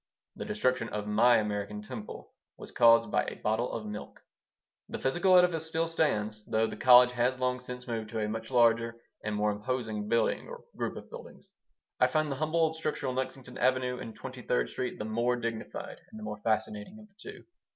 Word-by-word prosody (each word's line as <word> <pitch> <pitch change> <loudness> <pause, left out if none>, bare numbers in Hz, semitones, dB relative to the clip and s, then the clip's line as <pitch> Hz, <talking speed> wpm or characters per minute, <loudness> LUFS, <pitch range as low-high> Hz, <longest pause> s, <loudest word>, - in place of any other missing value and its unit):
The - - -6
destruction 130 - 0
of 105 -1 -4
my 110 +4 +5
American 105 -1 -3
Temple 110 -2 -8 0.2
was - - -10
caused 115 -2 +5
by - - +2
a - - -5
bottle 110 +3 -1
of 110 - -4
milk. 105 0 -8 0.7
The - - -4
physical 180 +7 +3
edifice 170 -3 +3
still 160 +1 0
stands, 110 -10 0
though 110 +1 +2
the 110 - -5
college 125 -1 +7
has 125 +1 +1
long 125 0 0
since 125 0 -8
moved 110 -2 -3
to 110 0 -3
a 105 - 0
much 110 +1 -5
larger 115 -2 +3 0.3
and 105 0 -2
more 105 0 +1
imposing 110 -1 -3
building 115 0 +1
or 485 -1 -9
group - - -3
of - - -11
buildings. 485 0 -11 0.5
I - - +5
find 155 -2 0
the 135 - -3
humble 155 +3 0
old 160 0 +1
structure 155 -3 -3
on 130 - -1
Lexington 130 -1 -5
Avenue 125 -1 +1
and 115 - -8
Twenty - - -8
third - - 0
Street 125 - -3
the 105 - -4
more 120 +3 +1
dignified 115 -2 -5
and - - -11
the 110 - -8
more 105 0 -5
fascinating 110 - -2
of 215 0 -14
the 200 - -31
two. - - -10
120 Hz, 205 wpm, -30 LUFS, 110-130 Hz, 0.7 s, college